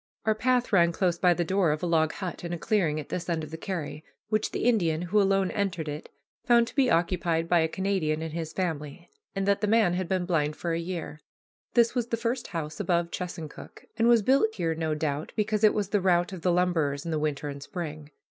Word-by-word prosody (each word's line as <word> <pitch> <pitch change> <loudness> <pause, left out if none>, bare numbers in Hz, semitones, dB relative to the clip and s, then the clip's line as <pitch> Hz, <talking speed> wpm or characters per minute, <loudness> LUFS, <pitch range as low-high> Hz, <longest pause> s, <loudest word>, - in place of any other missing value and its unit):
Our 220 - +4
path 245 +1 +1
ran 170 -3 +5
close 175 -1 0
by 180 -2 +4
the 175 - 0
door 185 0 +2
of 150 +2 -1
a - - +1
log 160 -2 +2
hut 185 -3 -6
in 170 - -4
a - - -2
clearing 165 -5 +1
at 150 - -8
this 180 0 -4
end 165 -2 -1
of 155 - -8
the - - -5
carry, 160 -4 -5 0.3
which 215 0 +1
the - - -3
Indian, 175 -9 +2
who 205 +4 +2
alone 195 -1 +2
entered 180 -6 -2
it, 150 +1 -6 0.3
found 235 -1 +5
to - - -16
be 270 -3 +3
occupied 170 -2 +1
by 175 0 +4
a 160 - +2
Canadian 160 -4 -1
and 160 -1 -5
his 160 -1 -4
family, 155 -6 -4 0.2
and 195 0 -1
that 200 0 +2
the 210 - +1
man 215 -4 +4
had 185 0 -2
been 185 -2 0
blind 155 -4 0
for 170 -1 -3
a 165 - -1
year. 170 -3 -5 0.6
This 235 -1 +4
was 245 -2 -1
the 230 - -1
first 235 +2 -2
house 160 -2 -5
above 170 -3 0
Chesuncook, 175 -4 -7
and 230 0 +2
was 235 -3 +5
built 240 -2 +3
here, 165 -3 0
no 160 -1 -1
doubt, 150 -1 -3
because 215 0 0
it 215 - +6
was 205 -2 -1
the 205 -2 +1
route 180 0 +2
of 180 - -7
the 180 - +2
lumberers 165 -5 +1
in 165 - -3
the 155 - 0
winter 150 -1 -2
and 140 -1 -6
spring. 155 -2 -6
175 Hz, 240 wpm, -27 LUFS, 160-200 Hz, 0.6 s, it